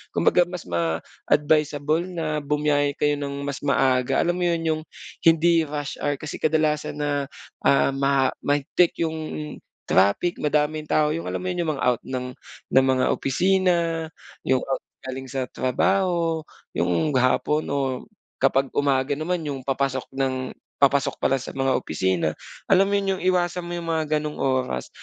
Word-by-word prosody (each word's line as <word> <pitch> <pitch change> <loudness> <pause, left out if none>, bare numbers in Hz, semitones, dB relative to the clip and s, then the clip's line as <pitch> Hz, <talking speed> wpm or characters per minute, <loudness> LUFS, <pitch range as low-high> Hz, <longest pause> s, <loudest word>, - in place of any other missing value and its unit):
Kumbaga 175 -1 +4
mas 180 -1 -6
ma-advisable 145 - 0
na 160 -4 -2
bumiyahe 145 -1 +1
kayo 145 -1 +1
nang 140 0 -4
mas 140 -1 -4
maaga. 130 -2 +2
Alam 175 +1 0
mo 180 - 0
yun, 170 -1 0
'yung 155 -1 0 0.5
hindi 165 -1 +4
rush 145 -1 -5
hour. 145 0 0
Kasi 150 +2 -7
kadalasan 150 -1 0
na, 145 -1 -1 0.4
ah, 140 0 +4
ma 135 -1 +2
mahigpit 145 +4 +1
'yung 160 -1 -2 0.7
traffic, 100 - +2
madaming 150 +1 0
tao. 150 -1 +2
'Yung 165 +2 -3
alam - - -3
mo 185 - -1
yun, 175 -2 -2
'yung - - +2
mga - - -5
out 125 -2 +2
ng 125 -1 -4 0.4
ng 130 0 +5
mga 130 - +2
opisina, 170 +1 +1 0.4
'yung 130 -1 +2
out 135 - -2 0.2
galing 130 0 -6
sa 130 0 -2
trabaho, 165 +3 +1 0.3
'yung 90 - 0
hapon 150 +4 +1
o 140 - -1 0.6
kapag 135 0 +3
umaga 140 -1 +1
naman 165 +4 -2
'yung 140 -3 -4
papasok 135 0 -1
ng 130 -1 -1 0.3
papasok 140 0 +3
pala 135 - +2
sa 130 - -7
mga 135 -1 +1
opisina 85 -1 0 0.3
alam 195 0 +4
mo 200 - +2
'yun 195 -1 -1
'yung - - -9
iwasan 175 0 0
mo 175 0 -5
'yung 170 - -5
mga 155 -2 0
gano'ng 150 0 -3
oras. 130 - -1
145 Hz, 160 wpm, -24 LUFS, 135-165 Hz, 0.7 s, ng